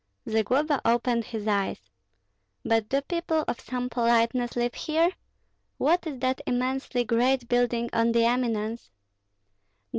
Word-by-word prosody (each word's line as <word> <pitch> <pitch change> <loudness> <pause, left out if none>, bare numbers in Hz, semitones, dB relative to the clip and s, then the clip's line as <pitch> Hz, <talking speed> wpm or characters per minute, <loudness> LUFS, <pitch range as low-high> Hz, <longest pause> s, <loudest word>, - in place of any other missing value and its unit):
Zagloba 265 +7 +1
opened 235 0 +1
his 220 -2 -5
eyes. 195 - -1 0.7
"But 225 -1 +1
do 275 +1 +1
people 320 0 -1
of - - -2
some 250 +2 -4
politeness 235 0 +1
live 240 0 0
here? 325 +3 +1 0.7
What 335 +4 +2
is 290 -4 -5
that 260 0 0
immensely 255 0 -1
great 240 +2 +1
building 240 -1 +1
on 230 0 +2
the 230 0 +3
eminence?" 230 - -1
245 Hz, 125 wpm, -26 LUFS, 230-265 Hz, 0.7 s, the